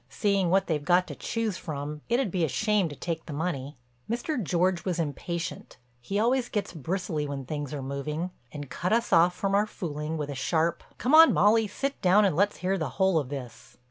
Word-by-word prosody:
Seeing 195 Hz, +1 st, +1 dB
what 190 Hz, +2 st, +3 dB
they've 150 Hz, -3 st, -1 dB
got 180 Hz, +2 st, +3 dB
to -, -, -5 dB
choose 225 Hz, -5 st, -2 dB
from 150 Hz, -1 st, -5 dB
it 235 Hz, -, +3 dB
would 255 Hz, -8 st, 0 dB
be 180 Hz, -2 st, 0 dB
a -, -, +3 dB
shame 205 Hz, -, +1 dB
to 145 Hz, -, -8 dB
take 165 Hz, +2 st, -4 dB
the 155 Hz, -, -5 dB
money." 145 Hz, -3 st, -3 dB, 0.3 s
Mr. 240 Hz, +4 st, -1 dB
George 180 Hz, 0 st, +1 dB
was 180 Hz, -3 st, -1 dB
impatient—he 145 Hz, -3 st, -5 dB
always 245 Hz, +2 st, +2 dB
gets 205 Hz, -3 st, -3 dB
bristly 160 Hz, -1 st, -2 dB
when 140 Hz, -2 st, -5 dB
things 145 Hz, 0 st, -4 dB
are 145 Hz, -3 st, -4 dB
moving—and 145 Hz, 0 st, -5 dB
cut 180 Hz, +4 st, -1 dB
us 235 Hz, +1 st, +1 dB
off 175 Hz, +2 st, +5 dB
from 195 Hz, 0 st, -1 dB
our 205 Hz, +2 st, +3 dB
fooling 155 Hz, -4 st, -4 dB
when 145 Hz, -1 st, -3 dB
a -, -, -3 dB
sharp: 160 Hz, +5 st, 0 dB
"Come 255 Hz, -, 0 dB
on, 320 Hz, +1 st, +9 dB
Molly, 215 Hz, +1 st, +4 dB
sit 275 Hz, +7 st, -4 dB
down 195 Hz, +3 st, +5 dB
and 190 Hz, -, +1 dB
let's 200 Hz, +4 st, +2 dB
hear 190 Hz, +1 st, +1 dB
the 155 Hz, -4 st, -2 dB
whole 190 Hz, -3 st, +3 dB
of 135 Hz, -4 st, -5 dB
this." 135 Hz, -4 st, -8 dB
170 Hz, 205 wpm, -27 LUFS, 150-200 Hz, 0.3 s, on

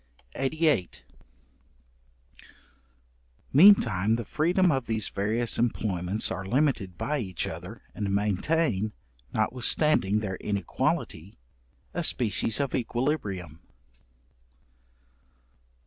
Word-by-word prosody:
§88. 145 Hz, -, 0 dB, 2.5 s
Meantime 115 Hz, -, +6 dB
the 115 Hz, -1 st, -4 dB
freedom 175 Hz, -, +2 dB
of 135 Hz, -4 st, -1 dB
these 110 Hz, -2 st, -1 dB
various 110 Hz, +5 st, -1 dB
employments 105 Hz, -4 st, -1 dB
are 95 Hz, -, -4 dB
limited 100 Hz, -, 0 dB
by 150 Hz, 0 st, -1 dB
each 95 Hz, -7 st, -3 dB
other, -, -, -8 dB
and 105 Hz, -2 st, -3 dB
maintain, 105 Hz, -, 0 dB, 0.4 s
notwithstanding 115 Hz, -1 st, +2 dB
their 95 Hz, -3 st, -4 dB
inequality, 100 Hz, -2 st, -2 dB, 0.6 s
a -, -, -2 dB
species 110 Hz, -, +1 dB
of 140 Hz, -3 st, -1 dB
equilibrium. 115 Hz, -, -2 dB
110 Hz, 85 wpm, -27 LUFS, 95-140 Hz, 2.5 s, Meantime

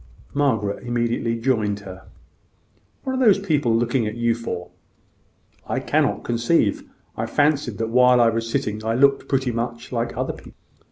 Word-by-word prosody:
Margaret 115 Hz, -8 st, 0 dB
immediately 120 Hz, -1 st, -1 dB
joined 110 Hz, -5 st, 0 dB
her. 95 Hz, -1 st, -11 dB, 1.0 s
"What 265 Hz, -, -2 dB
are 260 Hz, 0 st, +1 dB
those 210 Hz, -5 st, +6 dB
people 150 Hz, -, +1 dB
looking 120 Hz, 0 st, 0 dB
at 105 Hz, -, -4 dB
you 120 Hz, 0 st, +1 dB
for?" 90 Hz, -7 st, -6 dB, 1.0 s
"I -, -, -1 dB
cannot -, -, 0 dB
conceive. 120 Hz, -1 st, +1 dB, 0.3 s
I -, -, -3 dB
fancied 145 Hz, -5 st, +1 dB
that 115 Hz, 0 st, -2 dB
while 125 Hz, +1 st, +5 dB
I 120 Hz, -1 st, +5 dB
was 115 Hz, 0 st, -3 dB
sitting 110 Hz, -1 st, -2 dB
I 115 Hz, +1 st, 0 dB
looked 140 Hz, +2 st, +3 dB
pretty 130 Hz, -2 st, +1 dB
much 115 Hz, 0 st, -4 dB
like 120 Hz, -1 st, -2 dB
other -, -, -2 dB
people." -, -, -14 dB
120 Hz, 160 wpm, -22 LUFS, 115-135 Hz, 1.0 s, those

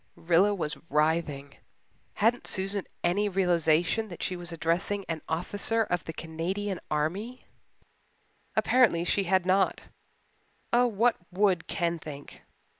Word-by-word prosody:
Rilla 180 Hz, +5 st, +3 dB
was 160 Hz, -4 st, -3 dB
writhing. 150 Hz, -2 st, 0 dB, 0.6 s
Hadn't 230 Hz, +4 st, +1 dB
Susan 195 Hz, +1 st, 0 dB, 0.2 s
any 200 Hz, +4 st, +2 dB
realization 175 Hz, +2 st, +2 dB
that 175 Hz, -4 st, -8 dB
she 185 Hz, -, -2 dB
was 175 Hz, -1 st, -6 dB
addressing 175 Hz, +5 st, -1 dB
an 160 Hz, -2 st, -3 dB
officer 205 Hz, +7 st, 0 dB
of 180 Hz, -5 st, -2 dB
the -, -, -4 dB
Canadian 180 Hz, +5 st, -3 dB
Army? 190 Hz, +12 st, -2 dB, 1.1 s
Apparently 230 Hz, -10 st, +3 dB
she 195 Hz, +2 st, +1 dB
had 185 Hz, 0 st, +2 dB
not. 190 Hz, +1 st, +2 dB, 0.9 s
Oh, 245 Hz, +1 st, +5 dB
what 230 Hz, +2 st, +2 dB
would 185 Hz, -2 st, +1 dB
Ken 170 Hz, -1 st, -1 dB
think? 145 Hz, -2 st, -10 dB
180 Hz, 120 wpm, -28 LUFS, 165-205 Hz, 1.1 s, Oh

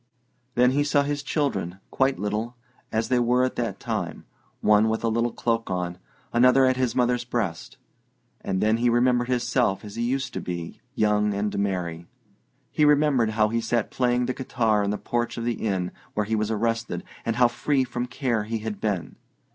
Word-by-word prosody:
Then 125 Hz, +1 st, +5 dB
he 145 Hz, +2 st, +2 dB
saw 145 Hz, 0 st, +2 dB
his 145 Hz, 0 st, -2 dB
children, 140 Hz, -, -1 dB
quite 135 Hz, 0 st, +2 dB
little, 105 Hz, +4 st, -2 dB, 0.4 s
as 110 Hz, +1 st, -1 dB
they 125 Hz, -, +3 dB
were 125 Hz, +1 st, +3 dB
at 130 Hz, -, -1 dB
that 115 Hz, -5 st, -2 dB
time: -, -, -4 dB, 0.3 s
one 105 Hz, +1 st, +4 dB
with 110 Hz, +1 st, -1 dB
a 115 Hz, -, +2 dB
little 115 Hz, +1 st, +1 dB
cloak 115 Hz, 0 st, -1 dB
on, 90 Hz, -1 st, -3 dB, 0.3 s
another 125 Hz, +2 st, +5 dB
at 130 Hz, 0 st, +3 dB
his 125 Hz, -2 st, 0 dB
mother's 125 Hz, -1 st, +2 dB
breast. 115 Hz, -9 st, -3 dB, 0.7 s
And 95 Hz, -1 st, -1 dB
then 110 Hz, +1 st, +3 dB
he 120 Hz, +1 st, +2 dB
remembered 120 Hz, +1 st, +3 dB
himself 120 Hz, -4 st, +1 dB
as 105 Hz, +1 st, -9 dB
he -, -, -1 dB
used 130 Hz, +3 st, -1 dB
to -, -, -3 dB
be 85 Hz, -2 st, -6 dB
young 105 Hz, -1 st, +2 dB
and 105 Hz, +1 st, -1 dB
merry. 85 Hz, -4 st, -2 dB, 0.6 s
He 155 Hz, -, +1 dB
remembered 145 Hz, -6 st, +4 dB
how 110 Hz, -1 st, +4 dB
he 115 Hz, +1 st, 0 dB
sat 115 Hz, -1 st, -1 dB
playing 125 Hz, -1 st, +1 dB
the 130 Hz, -, -1 dB
guitar 115 Hz, -5 st, +1 dB
in 100 Hz, -, 0 dB
the 105 Hz, -, -1 dB
porch 120 Hz, +2 st, -2 dB
of 115 Hz, -, -3 dB
the 120 Hz, -2 st, -2 dB
inn 95 Hz, -4 st, -1 dB, 0.2 s
where 105 Hz, -, +1 dB
he 110 Hz, +2 st, 0 dB
was 110 Hz, 0 st, 0 dB
arrested, 115 Hz, -4 st, -1 dB, 0.2 s
and 115 Hz, -, -1 dB
how 125 Hz, 0 st, +5 dB
free 130 Hz, +3 st, 0 dB
from 125 Hz, 0 st, -3 dB
care 120 Hz, -4 st, -1 dB
he 115 Hz, +1 st, -2 dB
had 110 Hz, -1 st, -5 dB
been. 100 Hz, -5 st, -2 dB
115 Hz, 195 wpm, -25 LUFS, 105-125 Hz, 0.7 s, Then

